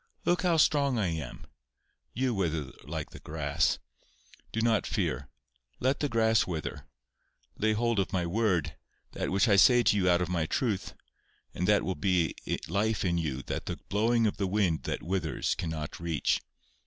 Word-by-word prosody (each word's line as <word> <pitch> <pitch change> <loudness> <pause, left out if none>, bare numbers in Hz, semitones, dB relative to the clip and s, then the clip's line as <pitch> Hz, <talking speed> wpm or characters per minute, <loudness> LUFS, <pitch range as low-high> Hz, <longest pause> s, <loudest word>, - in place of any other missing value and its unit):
Look 175 - +2
how 175 -3 +2
strong 140 -4 +3
I 100 -5 +1
am. 80 -7 -5 0.7
You 130 +1 0
wither 80 -8 -1
like - - -5
the - - -10
grass. 75 0 0 0.7
Do 115 - -2
not 115 -2 +2
fear. 70 - -1 0.5
Let 130 +2 +1
the 145 - 0
grass 110 -2 +3
wither. 80 -5 -5 0.7
Lay 110 0 +2
hold 115 0 +1
of 95 - 0
my 90 -2 0
word, 85 -6 0 0.4
that - - -3
which 100 +5 +3
I 100 -3 +5
say 120 +4 +6
to - - +4
you 95 -3 +2
out 85 0 +4
of - - -3
my 85 -3 -1
truth, 110 -3 -1 0.6
and 90 - -2
that 105 0 +4
will 95 - -1
be 90 -4 +1 0.3
life 105 +4 0
in 85 -1 +1
you 70 -5 -3
that - - -4
the - - -3
blowing 115 +3 +2
of 105 - 0
the 100 - 0
wind 95 -5 +1
that - - -3
withers 85 -3 -1
cannot 80 -3 -4
reach. 85 -3 0
95 Hz, 175 wpm, -29 LUFS, 80-115 Hz, 0.7 s, say